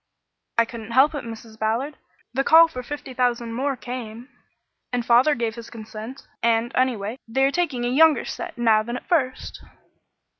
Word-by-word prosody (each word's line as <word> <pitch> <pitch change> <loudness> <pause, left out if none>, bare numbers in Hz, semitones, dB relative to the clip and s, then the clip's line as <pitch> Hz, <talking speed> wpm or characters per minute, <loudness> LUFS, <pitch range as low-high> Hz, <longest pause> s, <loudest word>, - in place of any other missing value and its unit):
"I 230 - +5
couldn't 230 -1 -8
help 270 +5 +5
it, 290 - -4
Mrs. 225 -1 -10
Ballard. 235 +7 -1 0.4
The 270 +2 +1
call 325 +3 +7
for 255 -6 -7
fifty 275 0 -7
thousand 240 -2 0
more 270 +3 -1
came, 245 0 -7 0.6
and 245 -1 -1
father 250 +6 +5
gave 230 -2 -2
his 235 0 -10
consent; 220 +3 -9
and, 230 +1 +2
anyway, 245 -2 0
they 265 +4 +1
are 270 - +4
taking 290 -8 -1
a - - 0
younger 300 +2 +4
set - - -6
now 225 -2 +4
than 235 +3 -4
at - - -12
first." 270 -8 -1
245 Hz, 175 wpm, -23 LUFS, 230-270 Hz, 0.6 s, call